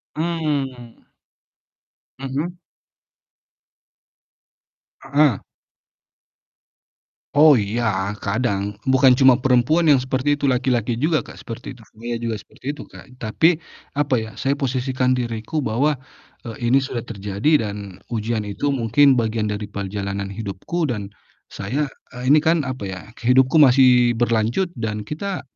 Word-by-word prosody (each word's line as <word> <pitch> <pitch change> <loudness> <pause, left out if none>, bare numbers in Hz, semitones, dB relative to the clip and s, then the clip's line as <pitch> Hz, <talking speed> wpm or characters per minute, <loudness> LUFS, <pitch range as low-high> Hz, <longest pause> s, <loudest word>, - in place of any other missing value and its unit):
Mmm. 145 -7 -3 1.2
Mhm. 145 +7 -4 2.4
Heeh. 140 -5 +2 2.0
Oh 150 -2 +7
iya 105 -2 -1
kadang 100 -2 -1
bukan 130 -1 +5
cuma 130 -1 +7
perempuan 135 +6 +3
yang 145 - +7
seperti 130 +3 0
itu 145 - -2
laki-laki 125 -2 0
juga 155 -3 +1
Kak - - -12
seperti 120 +4 -8
itu. 120 - -17
Saya 120 +2 -6
juga 115 -1 -2
seperti 115 - -18
itu - - -9
Kak, - - -14
tapi, 155 +10 +2 0.4
apa 145 -3 +2
ya 110 - -6
saya 135 - 0
posisikan 130 -2 0
diriku 120 +4 -4
bahwa, 135 +3 +1 0.5
eee, 115 +1 -3
ini 130 - +5
sudah 130 -3 -2
terjadi 105 +5 0
dan 100 -2 -7 0.2
ujian 110 -1 -2
itu 105 +8 -2
mungkin 135 +1 +3
bagian 110 -2 0
dari 105 0 -3
perjalanan 100 -1 -4
hidupku 110 - -3
dan, 105 -7 -3 0.4
saya 135 +9 -3 0.2
eee, 125 +1 -3
ini 150 - +7
kan 160 +1 +2
apa 130 -4 -5
ya 95 -1 -5 0.2
hidupku 130 +5 +3
masih 125 -3 +6
berlanjut 115 - 0
dan 110 -2 -3
kita, 180 - -4
125 Hz, 125 wpm, -21 LUFS, 110-140 Hz, 2.4 s, Oh